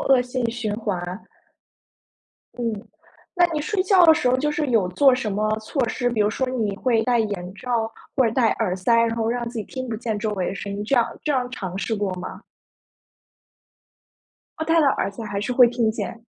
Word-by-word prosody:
恶 265 -2 +4
性 245 -1 -2
循 225 -3 -3
环。 185 -3 -4 1.3
嗯。 230 -2 -3 0.5
那 350 - +7
你 305 - -1
睡 380 +5 0
觉 370 -2 +5
的 320 - +8
时 250 - +1
候 255 - +3
就 295 +3 0
是 295 0 -1
有 220 -7 +2
做 265 +6 +5
什 240 -4 -2
么 210 +2 0
措 240 +4 -2
施， 245 - -1
比 235 -3 -1
如 210 - +2
说 260 +4 -1
你 225 -6 -1
会 230 -1 +1
戴 245 -1 +2
眼 195 -4 -3
罩、 230 -2 -2 0.3
或 265 - +4
者 220 - 0
戴 230 -2 +3
耳 200 -5 -1
塞， 190 +6 +2
然 230 0 +2
后 225 -1 0
让 240 0 -2
自 235 - -6
己 215 - -3
听 255 +4 -6
不 225 - -3
见 220 -1 -3
周 215 0 -2
围 185 -3 -2
的 - - -4
声 200 0 -5
音， 205 - -4
这 270 - +1
样 235 -1 +4 0.2
这 300 - -1
样 250 -2 0
尝 190 -7 -5
试 225 - -1
过 205 -2 -1
吗？ 180 0 -7 2.2
哦， 315 - -2
戴 330 +1 +3
了 300 - +3
耳 195 - 0
塞 210 +3 -8
还 200 -2 -3
是 210 - -2
会 245 -1 +7
听 235 -2 +1
见？ 230 +1 -5
230 Hz, 235 characters per minute, -23 LUFS, 210-255 Hz, 2.2 s, 的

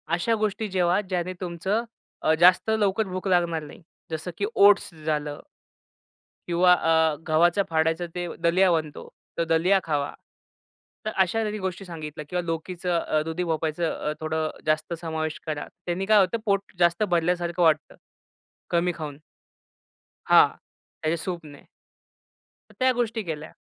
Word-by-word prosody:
अशा 225 +6 +1
गोष्टी 215 0 -1
जेवा 180 0 +2
ज्याने 185 -2 -3
तुमचं 190 +5 -1 0.4
अ, 155 - +3
जास्त 180 +4 +5
लवकर 215 -1 +1
भूक 185 +1 -4
लागणार 170 -3 +1
नाही. 150 +4 -12 0.3
जसं 160 +3 -4
की 205 - 0
ओट्स 200 -3 +5
झालं. 150 -2 -2 1.1
किंवा 180 +1 +5
अ, 160 -2 +3
गव्हाच्या 175 +5 +3
फाडायचा 160 +1 +1
ते 175 0 -3 0.2
दलिया 180 +2 +4
बनतो 155 -3 -2 0.3
तर 170 - +2
दलिया 165 +4 +3
खावा. 145 -2 -1 0.9
तर 215 - -1
अशा 190 +5 +1
त्यांनी 215 -1 -2
गोष्टी 190 0 -4
सांगितल्या 155 -3 -7
किंवा 180 0 -1
लोकीचं 170 +2 -2
अ, 155 -1 0
दुधी 165 +3 -3
भोपळयाच 160 -1 -2
अ, 155 -2 -1
थोडं 155 0 -1 0.2
जास्त 155 +2 0
समावेश 160 -1 -3
करा. 150 -1 -3 0.2
त्यांनी 180 +2 -2
काय 215 +1 +5
होतं 195 +4 +2
पोट 200 -1 0
जास्त 170 +4 +3
भरल्यासारखं 175 0 +1
वाटतं 160 -2 +2 0.8
कमी 175 +1 +2
खाऊन. 150 -3 -6 1.1
हां, - - +7 0.5
त्याच्या 160 +2 0
सूपने. 165 -6 -7 1.0
तर - - -17
त्या 260 0 +4
गोष्टी 230 -2 -1
केल्या. 155 -2 -6
175 Hz, 140 wpm, -25 LUFS, 160-190 Hz, 1.1 s, हां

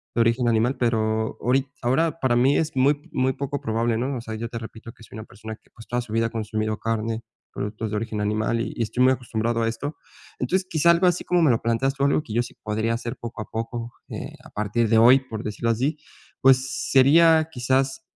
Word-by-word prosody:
de 120 - +3
origen 115 +2 +2
animal, 115 +3 +2
pero, 110 -2 0
orit 130 +3 +1
ahora 155 +7 +1
para 130 -4 +2
mí 130 +4 +4
es 160 -2 -1
muy 145 +5 +1
muy 130 -2 +1
poco 140 +1 -4
probable, 115 +1 0
¿no? 130 +4 -2
O - - -5
sea, 110 -1 -6
yo 115 +2 -4
te 115 0 -6
repito 115 0 -10
que - - -17
soy - - -13
una 110 - -7
persona 110 +2 -9
que - - -31
pues, 115 - -14
toda 120 0 -1
su 115 -3 -9
vida 115 0 +2
ha - - -7
consumido 110 -1 -2
carne, 115 0 -2 0.3
productos 105 +2 -4
de - - -2
origen 110 -1 -3
animal 110 +2 0
y - - -4
y 115 - -1
estoy 125 +3 0
muy 130 - +6
acostumbrado 115 -2 -2
a - - +1
esto. 130 +7 -4 0.4
Entonces, 190 +1 0
quizá 165 +1 +4
algo 170 +2 +3
así 180 -1 +1
como 180 -1 +2
me 155 - +5
lo 115 - +1
planteas 125 +4 0
tú, 140 - -2
algo 140 - +2
que 115 - -9
yo 120 +2 +2
sí - - -10
podría 110 +2 -1
hacer 120 0 -4
poco 120 -2 -7
a - - -5
poco, 115 +1 -5 0.2
eh, - - -6
a - - -13
partir 105 +2 0
de 115 - +4
hoy, 125 +4 +7
por 115 -4 -7
decirlo 110 +2 -2
así, 135 +7 0 0.4
pues, 130 0 +3
sería 160 +4 +6
quizás 130 0 0
120 Hz, 235 wpm, -24 LUFS, 110-135 Hz, 0.4 s, hoy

